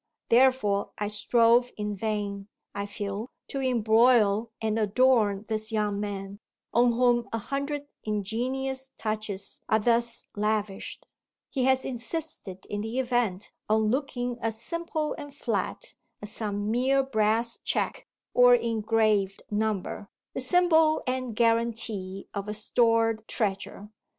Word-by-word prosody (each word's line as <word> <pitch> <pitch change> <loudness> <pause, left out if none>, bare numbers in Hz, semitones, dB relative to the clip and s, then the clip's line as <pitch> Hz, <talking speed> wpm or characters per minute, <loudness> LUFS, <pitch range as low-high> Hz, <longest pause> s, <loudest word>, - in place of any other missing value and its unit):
Therefore 235 -5 +3
I 205 0 -2
strove 235 +3 +3
in 210 -1 -3
vain, 205 -1 -3 0.3
I 200 0 -3
feel, 205 +3 -5 0.2
to 275 - -3
embroil 225 -3 +4
and 220 0 0
adorn 215 -2 +3
this 220 0 -2
young 210 -2 0
man 200 -1 -5 0.3
on 240 0 +4
whom 240 0 +2
a 225 - -1
hundred 280 +5 -3 0.2
ingenious 260 +6 -2
touches 215 -2 -3
are 220 - +5
thus 235 +1 +1
lavished: 210 -1 -2 0.5
he 260 -3 0
has 265 0 +3
insisted 245 - -5
in 205 0 -4
the 225 +3 -4
event 240 -7 0 0.2
on 215 0 +3
looking 245 -2 -2
as 225 -1 -2
simple 335 -1 -2
and 290 -1 -9
flat - - -3 0.3
as 210 0 -8
some 205 -1 -2
mere 265 +3 +3
brass 230 -1 0
check - - -2 0.3
or 245 0 +7
engraved 220 -3 +1
number, 210 -1 -2 0.2
the - - -2
symbol 320 +1 +4
and 255 -3 -2
guarantee 230 -4 0
of 200 0 -4
a 210 - -2
stored 225 0 +2
treasure. 205 0 -3
225 Hz, 125 wpm, -27 LUFS, 210-250 Hz, 0.5 s, or